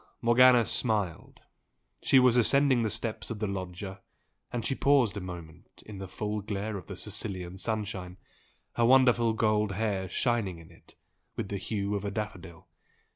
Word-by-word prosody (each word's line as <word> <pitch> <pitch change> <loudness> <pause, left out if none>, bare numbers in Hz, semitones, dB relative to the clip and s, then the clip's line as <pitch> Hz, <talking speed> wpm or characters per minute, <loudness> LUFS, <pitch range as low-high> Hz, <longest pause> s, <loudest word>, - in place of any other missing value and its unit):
Morgana 120 0 +6
smiled. 110 -7 -2 0.6
She 135 - +4
was 125 -2 +5
ascending 130 +1 +4
the 110 - 0
steps 110 +1 -3
of 115 - -4
the 105 - -2
loggia, 95 0 -5 0.5
and 120 -2 -3
she - - 0
paused 135 -7 +3
a - - -3
moment 85 -3 -10
in 105 -3 -9
the 95 - -6
full 105 +3 -3
glare 105 +1 -4
of 95 - -7
the 95 - -7
Sicilian 95 -4 -4
sunshine, 100 -4 -3 0.6
her 120 - +4
wonderful 120 -2 +5
gold 105 -2 +1
hair 100 -3 -2
shining 110 -6 0
in 85 -1 -14
it - - -20 0.4
with 100 - -4
the 100 - -3
hue 100 0 -2
of 100 -1 -2
a 100 - -2
daffodil. 100 -5 -6
105 Hz, 165 wpm, -29 LUFS, 95-115 Hz, 0.6 s, Morgana